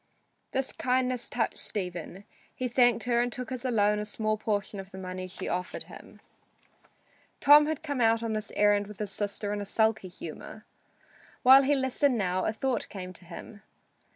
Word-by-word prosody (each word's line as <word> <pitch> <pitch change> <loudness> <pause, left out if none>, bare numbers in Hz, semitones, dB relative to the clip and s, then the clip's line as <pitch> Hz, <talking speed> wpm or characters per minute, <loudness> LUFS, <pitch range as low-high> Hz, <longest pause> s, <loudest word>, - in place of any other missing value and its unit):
This 265 0 -1
kindness 250 -1 0
touched 245 - -1
Stephen. 180 -1 -5 0.3
He 255 - -2
thanked 245 -2 +3
her 240 -1 +2
and 245 0 -1
took 250 +1 -6
as 255 -1 -4
a 255 - -1
loan 210 -2 +2
a 210 - -3
small 215 +1 -1
portion 210 -1 -2
of 190 0 -8
the 190 - -11
money 185 0 -5
she 185 - -6
offered 180 +1 -3
him. - - -13 1.2
Tom 295 +1 +7
had 315 0 -3
come 285 -5 -2
on 225 0 +2
this 215 -1 -3
errand 205 -1 +3
with 210 -1 -10
his 205 -1 -4
sister 205 +1 -3
in 205 - -3
a - - -3
sulky 220 0 +1
humor. 180 - -9 0.8
While 265 +1 +9
he 280 +2 +3
listened 265 0 +1
now 185 -2 0
a - - +1
thought 245 +2 -2
came 185 -2 -7
to 180 - -13
him. 200 +4 -10
220 Hz, 180 wpm, -28 LUFS, 200-250 Hz, 1.2 s, While